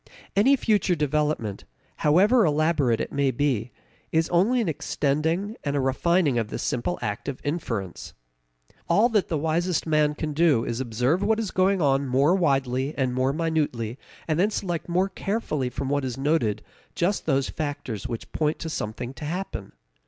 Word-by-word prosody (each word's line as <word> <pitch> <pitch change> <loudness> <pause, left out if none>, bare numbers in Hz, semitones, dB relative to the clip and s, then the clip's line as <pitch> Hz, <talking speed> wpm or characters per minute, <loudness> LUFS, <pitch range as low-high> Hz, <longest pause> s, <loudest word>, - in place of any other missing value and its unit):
Any 245 +8 +5
future 205 -8 +2
development, 150 - -1 0.3
however 200 +11 +4
elaborate 150 - +2
it - - -3
may 140 -1 +1
be, 125 -3 0 0.4
is 160 0 +2
only 200 +9 +3
an 225 - 0
extending 160 +6 -1
and 140 -1 -1
a - - +2
refining 140 +1 +2
of 115 - -2
this - - -5
simple 90 -8 -1
act 105 +6 -3
of 135 - -5
inference. 115 - -4 0.7
All 205 +8 +4
that 215 -5 +1
the 160 - -1
wisest 165 +3 0
man 150 -2 +2
can 150 0 -3
do 150 -7 +3
is 115 0 -3
to - - -1
observe 125 - +1
what 220 +2 +2
is 220 -4 -2
going 190 -1 +2
on 140 0 +2
more 135 +6 +3
widely 135 -5 +1
and 130 -3 0
more 130 +1 +1
minutely 145 -7 -1 0.3
and 155 0 0
then 200 +4 +4
select 175 -5 -3
more 180 +3 +2
carefully 195 - -2
from 130 +2 -4
what 145 0 0
is 125 -1 -3
noted 135 -7 0 0.3
just 180 +1 0
those 135 -3 +1
factors 140 -7 -4
which 115 -2 -6
point 155 0 0
to 160 - -5
something 120 +1 -4
to 135 +3 -8
happen. 165 - -4
150 Hz, 175 wpm, -25 LUFS, 130-175 Hz, 0.7 s, Any